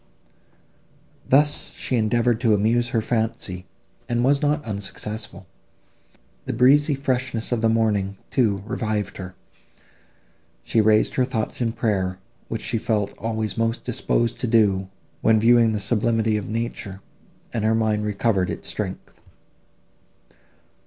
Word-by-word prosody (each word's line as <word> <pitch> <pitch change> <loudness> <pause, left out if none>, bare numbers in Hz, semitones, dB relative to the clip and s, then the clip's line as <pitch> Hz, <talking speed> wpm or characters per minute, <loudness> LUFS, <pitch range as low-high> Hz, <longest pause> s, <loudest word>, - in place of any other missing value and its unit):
Thus 145 +2 +3
she 130 - -2
endeavoured 120 +1 +1
to 115 -4 +4
amuse 115 +4 +1
her 115 -3 0
fancy, 110 -6 -2 0.4
and 120 0 +1
was 140 +2 +3
not 150 0 0
unsuccessful. 105 -1 -5 1.0
The 130 - -2
breezy 140 +5 +4
freshness 130 -4 -1
of 120 -2 0
the 115 - +3
morning, 105 -3 +1
too, 105 -7 +1
revived 110 -2 -2
her. 95 -1 -8 1.3
She 115 - +2
raised 110 0 +3
her 130 - +2
thoughts 125 -2 -3
in 115 -2 0
prayer, 100 -6 -1 0.3
which 115 - -4
she 115 - 0
felt 105 -4 0
always 110 0 -2
most 115 +1 0
disposed 120 -1 0
to 125 - -1
do, 100 -4 +2 0.3
when 110 -1 +4
viewing 115 0 +5
the 105 - -1
sublimity 110 0 +1
of 105 -2 -3
nature, 110 -3 -4 0.5
and 115 -3 -1
her 110 +1 +3
mind 110 -1 +1
recovered 105 -2 0
its - - -5
strength. - - -5
115 Hz, 130 wpm, -23 LUFS, 105-120 Hz, 1.3 s, viewing